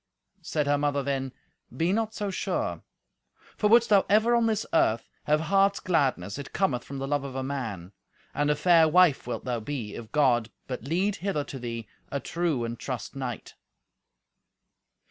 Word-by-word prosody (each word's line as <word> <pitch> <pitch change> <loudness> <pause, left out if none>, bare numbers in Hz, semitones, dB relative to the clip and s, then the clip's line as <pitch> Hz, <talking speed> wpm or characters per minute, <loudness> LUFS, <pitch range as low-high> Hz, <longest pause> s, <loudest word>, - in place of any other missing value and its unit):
Said 150 -2 -1
her 145 0 +2
mother 145 -1 0
then, 135 -1 -2 0.5
"Be 170 +3 +2
not 220 0 -1
so 205 -1 -2
sure; - - -2 0.7
for 210 - +1
wouldst 235 +1 +6
thou 200 -2 +6
ever 220 +4 +4
on 235 -1 +3
this 220 -1 0
earth 115 -7 +2 0.2
have 150 +1 +2
heart's 195 +4 +3
gladness, 135 - 0
it 140 - -8
cometh 140 -11 0
from 140 - -7
the 135 0 -3
love 145 0 0
of 135 -2 -7
a 130 - -2
man. 115 -10 -4 0.4
And 145 0 +1
a 150 - +3
fair 165 +1 +5
wife 160 -5 +4
wilt 120 - -4
thou 120 -2 -1
be, 110 -3 -5
if 115 -1 -9
God 125 -6 +3 0.2
but 125 -2 -6
lead 185 +7 0
hither 185 -6 -1
to 135 - -8
thee 115 -2 -5 0.2
a 140 - -1
true 165 -5 -1
and 115 0 -4
trust 125 -4 -5
knight." 130 -4 -5
145 Hz, 180 wpm, -27 LUFS, 125-180 Hz, 0.7 s, wouldst